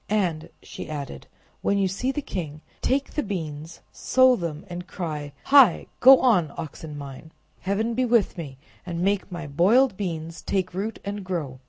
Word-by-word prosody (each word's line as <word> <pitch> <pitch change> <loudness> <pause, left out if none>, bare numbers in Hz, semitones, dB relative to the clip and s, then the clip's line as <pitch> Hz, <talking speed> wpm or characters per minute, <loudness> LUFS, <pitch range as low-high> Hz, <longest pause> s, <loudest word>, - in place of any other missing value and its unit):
"And," 170 -6 0
she - - -8
added, 140 - -6 0.3
"when 200 - +1
you 195 -1 +2
see 225 +8 -1
the 295 +1 -4
king, 155 - -5 0.2
take 275 +1 0
the 300 - 0
beans, 160 - -6
sow 255 -1 +4
them, 170 -3 -5
and 180 0 -7
cry, 150 -6 -5
'Hi! 270 -10 +6
go 265 +1 +8
on, 180 - +3
oxen 155 -2 -7
mine! 140 +2 -9 0.3
Heaven 215 +5 -1
be 255 +2 +1
with 235 -4 +2
me, 145 -6 -7 0.3
and 170 -1 -4
make 200 0 0
my 170 -3 -5
boiled 190 - +3
beans 165 -4 -4
take 185 -2 -1
root 205 +5 -3
and 200 0 -4
grow! 160 -9 -4
180 Hz, 170 wpm, -25 LUFS, 155-210 Hz, 0.3 s, go